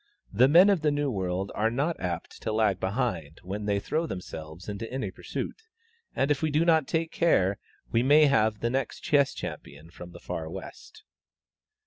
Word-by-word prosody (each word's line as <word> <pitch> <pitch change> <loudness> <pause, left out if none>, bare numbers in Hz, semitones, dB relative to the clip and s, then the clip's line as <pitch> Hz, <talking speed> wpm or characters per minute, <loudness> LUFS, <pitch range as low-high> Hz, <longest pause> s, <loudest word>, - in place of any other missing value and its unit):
The 120 +6 +5
men 175 +8 +7
of 190 -5 +1
the 155 - +2
New 145 -1 0
World 95 -2 -2
are 110 +2 +1
not 145 +8 -1
apt 85 -2 -5
to 110 - -2
lag 110 -4 +2
behind 95 - -2
when 100 +3 -5
they 100 -1 +1
throw 160 +10 -2
themselves 85 - -8
into 105 +2 -5
any 130 +1 -3
pursuit, - - -6 0.5
and 135 +2 +1
if 145 - +1
we 160 - +1
do 155 +3 +2
not 160 -4 +3
take 165 0 -1
care, 100 - +2 0.3
we 115 - +3
may 145 +4 +6
have 110 -6 +2
the 115 - 0
next 135 -2 -2
chess 140 -2 +3
champion 75 +4 -8
from 90 0 -10
the - - -12
far 80 -1 -5
west." - - -10
115 Hz, 185 wpm, -27 LUFS, 95-145 Hz, 0.5 s, men